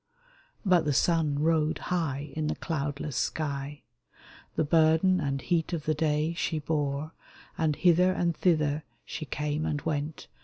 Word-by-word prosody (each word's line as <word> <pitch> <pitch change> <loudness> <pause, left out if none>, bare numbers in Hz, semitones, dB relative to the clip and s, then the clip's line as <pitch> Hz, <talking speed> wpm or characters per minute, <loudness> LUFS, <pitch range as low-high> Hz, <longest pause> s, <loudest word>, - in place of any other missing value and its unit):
But 180 -4 +4
the 145 - +1
sun 155 0 +2
rode 155 0 +2 0.2
high 145 -4 -2
in 155 -1 -1
the - - -1
cloudless 145 -3 -3
sky; 140 +1 -2 0.7
The - - +2
burden 160 +4 +4
and 140 -3 -1
heat 170 +2 0
of 160 -3 -2
the 155 - +2
day 155 +1 0
she 165 -1 -1
bore 150 0 -2 0.4
And 155 -2 +1
hither 180 +3 +4
and 175 -2 0
thither 155 -4 +1 0.2
she 155 - -5
came 150 +1 -2
and 150 -1 -1
went. 150 -1 -3
155 Hz, 150 wpm, -28 LUFS, 145-165 Hz, 0.7 s, But